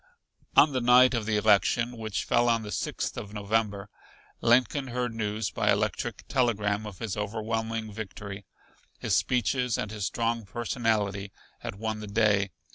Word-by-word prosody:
On 150 - +7
the 130 - 0
night 125 +2 +6
of 115 -3 -1
the 110 -1 +2
election, 110 +3 +3
which 110 -2 -3
fell 120 0 +2
on 115 -1 +2
the 105 - -6
Sixth - - -3
of 105 +1 -9
November, 105 -1 -1 0.5
Lincoln 125 +3 +3
heard 125 -1 -2
news 110 0 -2
by - - +2
electric - - -1
telegram 105 -4 +1
of 100 -3 -9
his 110 -2 -4
overwhelming 110 +1 -3
victory. 100 -1 -7 0.5
His - - 0
speeches 125 0 +1
and 105 - -3
his 105 -3 -2
strong 115 0 -1
personality 105 -2 -1 0.3
had - - -6
won 110 +1 -3
the 105 - -7
day. 100 -1 +2
110 Hz, 155 wpm, -28 LUFS, 105-120 Hz, 0.5 s, On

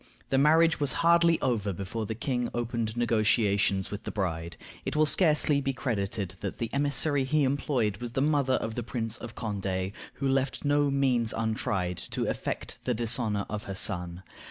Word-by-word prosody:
The 135 - +3
marriage 160 +3 +4
was 145 -2 +1
hardly 170 -1 +5
over 110 -6 0
before 100 +4 -4
the 110 - -3
king 125 +1 -1
opened 115 -1 -2
negotiations 105 -4 +2
with 105 - -5
the - - -4
bride. 85 -4 -3 0.3
It - - -3
will 155 0 +4
be - - +3
scarcely 150 -4 +3
credited 100 -6 -3
that 100 - -4
the 115 -1 -4
emissary 145 0 +1
he 145 +3 +2
employed 130 -6 0
was 120 +1 -6
the - - 0
mother 145 -3 +2
of 110 -2 -2
the 120 - -3
Prince 115 -1 -4
of 120 - -9
Condé, 95 -3 -3 0.2
who 140 - -2
left 135 +1 0
no 145 0 +3
means 130 -5 +2
untried 105 -5 -1
to - - -3
effect - - -3
the 125 - 0
dishonor 110 -3 +1
of 105 0 -5
her 95 - -5
son. 90 -4 -1
115 Hz, 180 wpm, -28 LUFS, 100-140 Hz, 0.3 s, hardly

